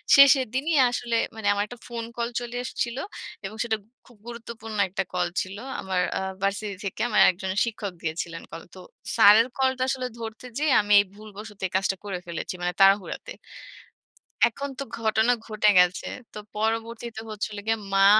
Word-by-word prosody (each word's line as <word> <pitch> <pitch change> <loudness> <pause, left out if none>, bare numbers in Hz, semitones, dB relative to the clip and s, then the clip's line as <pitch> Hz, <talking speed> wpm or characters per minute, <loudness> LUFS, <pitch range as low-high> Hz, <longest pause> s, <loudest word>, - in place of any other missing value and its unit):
শেষের 275 -1 +7
দিনই 300 +4 +1
আসলে 240 -1 -2 0.2
মানে 220 -2 -3
আমার 205 0 0
একটা 245 +1 -11
ফোন 235 -1 -4
কল 235 0 -1
চলে 240 0 -7
এসেছিল। 240 -1 -3 0.5
এবং 210 - -6
সেটা 220 -2 0 0.3
খুব 240 -3 -19
গুরুত্বপূর্ণ 230 -2 -7
একটা 195 +1 -1
কল 180 -1 +1
ছিল। 190 +2 -6 0.2
আমার 190 -1 -1 0.2
আ - - -3 0.2
ভার্সিটি 200 +1 -1
থেকে 195 +3 -4
আমার 210 -2 +4
একজন 190 +1 -5
শিক্ষক 210 -4 -4
দিয়েছিলেন 165 +1 -4
কল। 165 - -7
তো 185 - -10 0.4
স্যারের 215 +3 +8
কলটা 260 -1 +1
আসলে 255 -1 -1
ধরতে 225 +1 -7
যেয়ে 300 -3 +2
আমি 205 0 +1
এই 200 - +3
ভুলবশত 210 0 -11
এই - - -20
কাজটা 195 0 +2
করে 195 -3 -3
ফেলেছি, 170 +1 -4
মানে 180 0 -1
তাড়াহুড়াতে। 195 - +3 1.2
এখন 280 +5 -5
তো 275 - -3 0.2
ঘটনা 220 +2 +3
ঘটে 215 -1 +2
গেছে। 180 +1 +3 0.3
তো - - -7 0.2
পরবর্তীতে 225 +1 -2
হচ্ছিল 210 0 -4
গিয়ে, 225 0 +1 0.2
মা 195 0 +6
215 Hz, 170 wpm, -26 LUFS, 195-235 Hz, 1.2 s, স্যারের